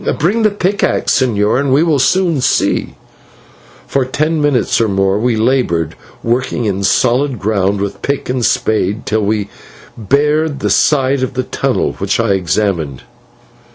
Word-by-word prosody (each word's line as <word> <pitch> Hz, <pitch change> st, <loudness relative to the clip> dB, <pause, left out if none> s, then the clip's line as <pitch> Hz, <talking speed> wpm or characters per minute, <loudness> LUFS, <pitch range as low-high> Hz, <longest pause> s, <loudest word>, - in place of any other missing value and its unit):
Bring 195 Hz, +10 st, +1 dB
the 215 Hz, -, +4 dB
pickaxe, 200 Hz, -6 st, 0 dB
señor, 110 Hz, -2 st, +1 dB
and 140 Hz, -1 st, 0 dB
we 140 Hz, +4 st, +4 dB
will 155 Hz, -4 st, +1 dB
soon 170 Hz, 0 st, +2 dB
see." -, -, 0 dB, 0.9 s
For 135 Hz, -, 0 dB
ten 155 Hz, +5 st, -1 dB
minutes 140 Hz, -5 st, +1 dB
or 115 Hz, -, +2 dB
more 95 Hz, 0 st, +1 dB
we 120 Hz, +1 st, +1 dB
laboured, 110 Hz, -, 0 dB, 0.3 s
working 120 Hz, 0 st, -1 dB
in 100 Hz, -1 st, -1 dB
soft 125 Hz, +6 st, +1 dB
ground 100 Hz, -1 st, 0 dB
with 100 Hz, 0 st, -4 dB
pick 140 Hz, 0 st, -2 dB
and 125 Hz, -1 st, -2 dB
spade 110 Hz, -2 st, 0 dB
till 110 Hz, +1 st, 0 dB
we 105 Hz, -1 st, -1 dB, 0.5 s
bared 145 Hz, +6 st, 0 dB
the -, -, 0 dB
side 135 Hz, -2 st, +2 dB
of 130 Hz, 0 st, -3 dB
a 130 Hz, -, +1 dB
tunnel, 135 Hz, +1 st, -1 dB
which 100 Hz, +2 st, -1 dB
I 115 Hz, -1 st, +1 dB
examined. 90 Hz, -6 st, -1 dB
125 Hz, 155 wpm, -15 LUFS, 100-140 Hz, 0.9 s, the